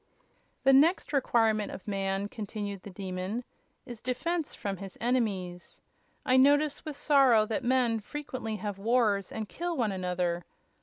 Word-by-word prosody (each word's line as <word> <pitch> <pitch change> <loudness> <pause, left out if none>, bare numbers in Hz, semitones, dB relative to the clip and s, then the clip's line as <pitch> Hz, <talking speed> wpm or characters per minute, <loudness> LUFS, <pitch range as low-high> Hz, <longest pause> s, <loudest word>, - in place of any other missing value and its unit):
"The 270 - +6
next 305 +3 +4
requirement 225 -6 +2
of 190 - -9
man," 195 0 -1
continued 205 -2 -5
the 205 - -9
Demon, 190 +4 -4 0.4
"is 240 -3 -9
defense 315 +6 -2
from 195 -1 -4
his 195 -1 -9
enemies. 200 -8 -2 0.5
I 255 - +4
notice 290 +2 +4
with 305 -2 -6
sorrow 270 -7 +5
that 215 0 -2
men 245 -2 +2
frequently 255 -2 -5
have 205 -2 -5
wars 215 -3 +2
and 220 -1 -4
kill 345 +5 -4
one 225 -5 +1
another. 180 -2 -1
220 Hz, 145 wpm, -29 LUFS, 195-260 Hz, 0.5 s, The